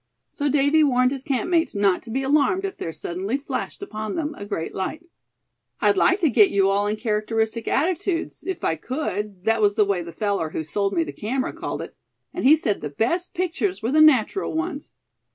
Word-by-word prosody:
So 290 0 -1
Davy 285 +3 +4
warned 255 -3 +3
his 270 -1 -5
campmates 325 +3 0
not 200 -2 +2
to 230 - -13
be 265 +4 -1
alarmed 300 +7 +2
if 385 - -4
there 165 - -4
suddenly 190 +9 -3
flashed 285 +7 -5
upon 215 - -5
them 310 -1 -2
a 205 - -8
great 165 -6 -4
light. 310 - -4 0.7
"I'd - - +3
like 385 0 +3
to 320 - +4
get 215 -3 +6
you 195 -1 +3
all 200 +1 +1
in 210 - 0
characteristic 220 +1 -1
attitudes, 340 +3 -1
if 380 -2 -4
I 160 - +1
could 210 - -4
that 225 +1 +2
was 205 -1 +3
the 210 - +4
way 195 -3 0
the 170 0 -8
feller 200 -2 -1
who 160 - -4
sold 195 +6 -1
me 335 - +2
the - - -7
camera 255 +5 -2
called - - -4
it; - - -11 0.4
and - - -3
he 295 +4 +8
said 215 -10 -1
the 150 - -4
best 335 - -1
pictures 370 - -1
were 230 - 0
the 310 +2 +5
natural 310 - +3
ones. 320 -3 -4
250 Hz, 205 wpm, -23 LUFS, 205-315 Hz, 0.7 s, he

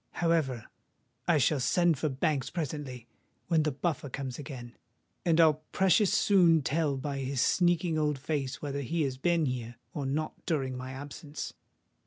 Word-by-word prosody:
However, 155 -9 +1 0.6
I 170 - +4
shall 145 +1 +3
send 170 +3 +2
for 155 - 0
Banks 135 -1 0
presently, 145 -7 -4 0.4
when 165 -2 +4
the 150 0 +1
Buffer 145 0 -2
comes 130 -1 -5
again; 125 -4 -8 0.5
and 165 -1 +3
I'll 155 -2 +5
precious 190 +1 +4
soon 170 -6 +5
tell 145 0 0
by 140 +1 -3
his 135 0 -2
sneaking 175 +1 +2
old 150 -2 +1
face 140 -1 -3
whether 140 -1 -2
he 155 +5 -1
has 130 -2 -2
been 170 +1 +2
here, 120 -3 -3 0.2
or 145 -6 -3
not, 155 +3 -3
during 135 -5 0
my 130 +1 -6
absence!" 145 +2 -7
145 Hz, 160 wpm, -30 LUFS, 130-165 Hz, 0.6 s, I'll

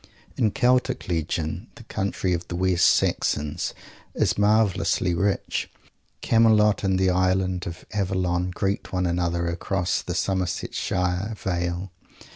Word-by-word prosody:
In 110 - +2
Celtic 125 +1 +1
legend 80 -2 -2
the - - -12
country 95 -1 -2
of 85 0 -3
the 90 - -5
West 90 -1 +3
Saxons 75 0 +1 0.4
is - - +2
marvellously 105 -3 +2
rich. 100 +3 -1 0.5
Camelot 110 -2 +4
and 95 -1 +2
the 95 0 +3
Island 95 0 +1
of 85 - -8
Avalon 90 -3 0
greet 95 +2 -2
one 90 -1 0
another 85 0 0
across 90 +1 -1
the - - -5
Somersetshire 90 +1 -1
vale. 90 0 -2
95 Hz, 120 wpm, -24 LUFS, 90-100 Hz, 0.5 s, Camelot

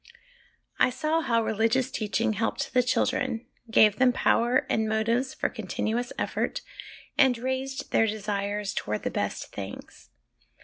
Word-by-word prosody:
I - - +5
saw 310 +5 0
how 230 -6 +1
religious 225 +5 +1
teaching 220 +1 0
helped 225 +2 -2
the 250 - +5
children, 250 -1 0 0.2
gave 215 -2 +5
them 255 -1 +5
power 245 +1 +2
and 220 0 0
motives 230 +4 0
for - - 0
continuous 240 +3 -3
effort, - - -2 0.6
and 265 -3 +5
raised 260 +2 -3
their 225 - +4
desires 205 -1 -2
towards 105 0 -3
the - - -1
best - - -3
things. - - -9
230 Hz, 135 wpm, -27 LUFS, 220-255 Hz, 0.6 s, I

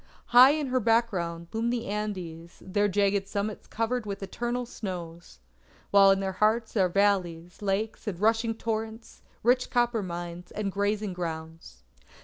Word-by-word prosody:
High 250 +3 +8
in 305 -1 -1
her 255 0 +2
background 195 -8 0
loom 225 +1 0
the 240 -1 -2
Andes, 185 -5 -5
their 205 +2 +1
jagged 200 0 +1
summits 205 +1 -4
covered 230 0 -2
with 200 -1 -5
eternal 240 +5 -3
snows; 175 - -7 0.5
while 200 -1 +7
in 195 0 +4
their 190 -1 -1
hearts 220 +4 +1
are 190 -4 +3
valleys, 180 -3 0
lakes, 205 +3 -2
and 185 -5 -3
rushing 225 +2 +2
torrents, 225 0 -5 0.2
rich 250 +2 +3
copper 240 -2 +1
mines, 175 -1 -6
and 205 -2 -2
grazing 205 0 -1
grounds. 160 - -7
205 Hz, 145 wpm, -28 LUFS, 180-225 Hz, 0.5 s, High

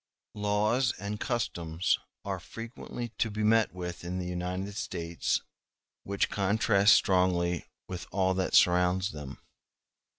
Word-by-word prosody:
Laws 105 +4 +1
and 100 +2 -4
customs 85 -8 0 0.3
are - - -2
frequently 115 +1 -7
to 115 - +2
be 105 +1 -3
met 110 +1 +4
with 90 -1 -6
in 90 +1 -3
the 90 - -3
United 90 +3 -3
States 85 -5 -2 0.6
which 100 0 0
contrast 100 0 +4
strongly 90 -2 +2 0.2
with 90 -2 -6
all 95 0 +2
that 95 0 0
surrounds 90 +2 +4
them. 75 -3 -8
95 Hz, 125 wpm, -29 LUFS, 90-105 Hz, 0.6 s, met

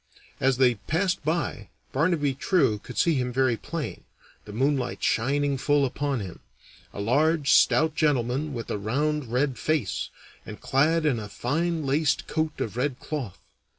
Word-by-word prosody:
As 130 -1 +2
they 130 -2 +5
passed 180 +2 0
by, 160 +3 -2 0.2
Barnaby 150 -1 +1
True 135 - +1
could 125 - -10
see 170 -2 +3
him 125 -3 -1
very 130 -1 +2
plain, 165 +6 -5 0.4
the 105 - -9
moonlight 130 +3 -1
shining 140 +3 +1
full 145 +1 +3
upon 135 -1 -2
him 90 -4 -8 0.5
a - - -8
large, 145 +7 +2
stout 160 0 +4
gentleman 145 -1 0
with 115 -4 -5
a 105 - -2
round 140 +4 -1
red 130 +1 0
face, 150 - -1 0.3
and 105 - -9
clad 150 +6 +2
in 135 -6 +2
a 105 -1 -7
fine 160 +8 -1
laced 145 +2 +1
coat 155 -1 -2
of 110 +1 -3
red 130 0 -1
cloth. 130 -11 -5
140 Hz, 155 wpm, -26 LUFS, 125-155 Hz, 0.5 s, they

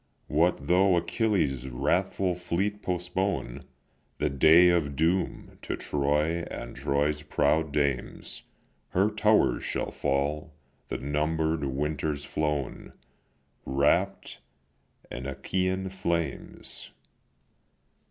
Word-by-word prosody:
What 85 +4 +1
though 95 +1 +4
Achilles' 85 - 0
wrathful 90 +8 0
fleet 95 +4 -2
postpone 90 -6 -2 0.5
The - - 0
day 80 +6 +7
of 80 -5 +1
doom 85 +5 -1
to - - -4
Troy 75 +4 0
and - - -7
Troy's 75 +2 0
proud 75 +1 +1
dames, 70 -4 -2 0.5
Her 100 +4 +2
towers 105 0 +3
shall - - -2
fall, 75 +2 -1 0.3
the - - -3
number'd 80 +2 0
winters 75 +2 -2
flown, 75 -2 -3 0.7
Wrapp'd 65 +1 +1 0.7
in 65 +2 -5
Achaean 95 +7 -1
flames." 85 -6 -3
80 Hz, 95 wpm, -28 LUFS, 70-90 Hz, 0.7 s, day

